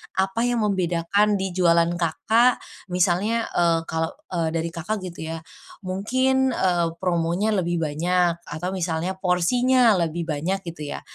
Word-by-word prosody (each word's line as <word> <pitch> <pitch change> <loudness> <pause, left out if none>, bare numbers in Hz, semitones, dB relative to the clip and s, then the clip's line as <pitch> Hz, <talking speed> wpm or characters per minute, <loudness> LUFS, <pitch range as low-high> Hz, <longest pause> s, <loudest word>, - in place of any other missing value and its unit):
apa 190 +3 0
yang 240 -2 0
membedakan 195 +1 +1
di 190 -1 -2
jualan 170 -2 +3
Kakak 225 +9 +2 0.2
misalnya, 185 +5 +1 0.2
eee, 165 -1 +2
kalau, 160 0 -2 0.2
eee, 165 -2 0
dari 165 0 -2
Kakak 185 +4 -4
gitu 170 -3 -7
ya, 160 - -9 0.4
mungkin, 260 +7 +1
eee, 175 -2 +1
promonya 175 +3 0
lebih 175 -1 -1
banyak, 170 +3 +1
atau 160 +5 -4
misalnya 170 -3 -2
porsinya 225 +6 +3
lebih 170 0 -1
banyak 165 +6 -1
gitu 155 -3 -6
ya, - - -6
180 Hz, 140 wpm, -23 LUFS, 170-205 Hz, 0.4 s, jualan